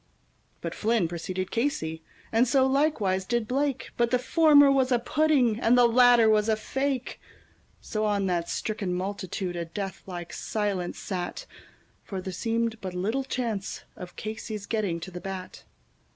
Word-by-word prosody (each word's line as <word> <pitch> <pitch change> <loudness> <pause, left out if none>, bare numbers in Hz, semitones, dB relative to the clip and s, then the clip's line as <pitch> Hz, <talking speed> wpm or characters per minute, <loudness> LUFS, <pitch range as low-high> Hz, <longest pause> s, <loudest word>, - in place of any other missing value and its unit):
But - - -4
Flynn 220 -5 +1
preceded 180 +2 -4
Casey, 160 - -1 0.3
and 230 +3 +3
so 260 +2 +4
likewise 265 -9 +1
did 230 +2 -1
Blake, 275 +1 -1
But 235 -1 +2
the 250 - +3
former 285 +1 +6
was 265 -1 +2
a 245 - +5
pudding, 250 -3 +2
and 240 +1 +4
the 245 - +7
latter 240 -1 +6
was 215 0 +3
a 220 - +4
fake; 265 +3 -3 0.6
So 215 0 -3
on 205 -2 +1
that 175 -2 -1
stricken 200 -4 -2
multitude 185 -1 -3
a 170 - -2
death 195 +3 -5
like 175 -2 -7
silence 200 -5 -2
sat, 185 - -4 0.6
For 195 - -5
there 185 0 -5
seemed 230 +3 -1
but 185 -2 -5
little 220 +9 -1
chance 235 -7 -3
of 180 -1 -9
Casey's 215 -1 -5
getting 205 -7 -1
to 185 - -7
the 180 0 -7
bat. 190 -1 -7
215 Hz, 160 wpm, -27 LUFS, 185-245 Hz, 0.6 s, the